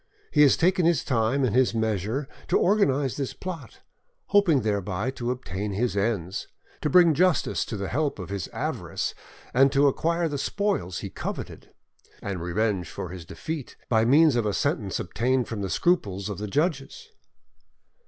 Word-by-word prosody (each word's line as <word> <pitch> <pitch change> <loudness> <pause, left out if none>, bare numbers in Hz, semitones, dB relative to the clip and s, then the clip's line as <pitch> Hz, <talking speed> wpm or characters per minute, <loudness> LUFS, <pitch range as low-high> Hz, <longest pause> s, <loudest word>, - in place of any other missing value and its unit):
He 150 - +4
has 145 -3 +6
taken 180 +1 +3
his 170 -1 +3
time 125 +2 +1
and 120 -3 +1
his 130 -2 +3
measures 110 +4 -1 0.2
to - - +3
organise 145 - +2
this 140 -3 -3
plot, 165 -10 -8 0.5
hoping 190 -9 +4
thereby 105 +2 -1
to 120 -2 -4
obtain 105 -5 -3
his 115 +2 -1
ends, 100 -3 -1 0.3
to 150 - 0
bring 170 +1 +6
justice 180 +2 +2
to 110 - -5
the 100 0 -3
help 145 +5 -1
of 95 -2 -7
his 100 -4 -3
avarice, - - -3 0.4
and 135 +2 +5
to 140 0 +4
acquire 165 +4 +1
the 145 -3 -3
spoils 190 - -1
he - - -6
coveted, - - -6 0.5
and 95 -4 -4
revenge 95 +1 -1
for 90 - -6
his 90 -2 -8
defeat, 155 - -6
by 110 -2 +3
means 145 +4 +5
of 115 -3 +1
a 105 - -1
sentence - - -1
obtained 125 0 0
from 110 -2 -4
the 95 - -3
scruples 100 - 0
of 100 -2 -5
the 105 - -4
judges." 155 - -2
125 Hz, 170 wpm, -26 LUFS, 100-150 Hz, 0.5 s, has